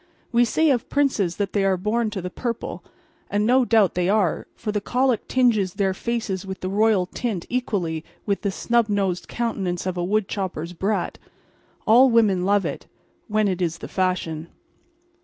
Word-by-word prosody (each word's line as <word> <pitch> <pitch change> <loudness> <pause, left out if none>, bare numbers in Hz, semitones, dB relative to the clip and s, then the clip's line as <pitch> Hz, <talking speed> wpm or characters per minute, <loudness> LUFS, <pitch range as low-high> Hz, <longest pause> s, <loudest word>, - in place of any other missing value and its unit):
We 240 0 +4
say 315 +6 +2
of 245 -4 -1
princes 240 -12 +1
that 200 -2 -2
they 200 - +2
are 190 -1 +2
born 215 +4 0
to 200 -4 -5
the 180 - -4
purple; 235 +1 -4 0.5
and 205 +1 +1
no 255 +3 +4
doubt 220 -5 +4
they 180 0 0
are, 200 -4 +1
for 215 - -4
the 210 -1 -1
colic 250 +2 0
tinges 220 -8 +2
their 195 -2 +1
faces 220 -3 -3
with 190 -1 -7
the 185 - -2
royal 210 -1 +3
tint 195 -2 -3
equally 185 -10 -1 0.2
with 200 -2 0
the 200 - 0
snub 235 +3 +1
nosed 195 -3 -1
countenance 195 -7 -2
of 185 -1 -2
a 175 - -1
woodchopper's 190 -4 -2
brat. 195 +5 -2 0.7
All 250 +4 +7
women 210 -6 +3
love 200 0 +2
it—when 215 -1 -4
it 185 -2 -1
is 170 -1 0
the - - -8
fashion. 170 -4 -1
205 Hz, 175 wpm, -23 LUFS, 185-230 Hz, 0.7 s, All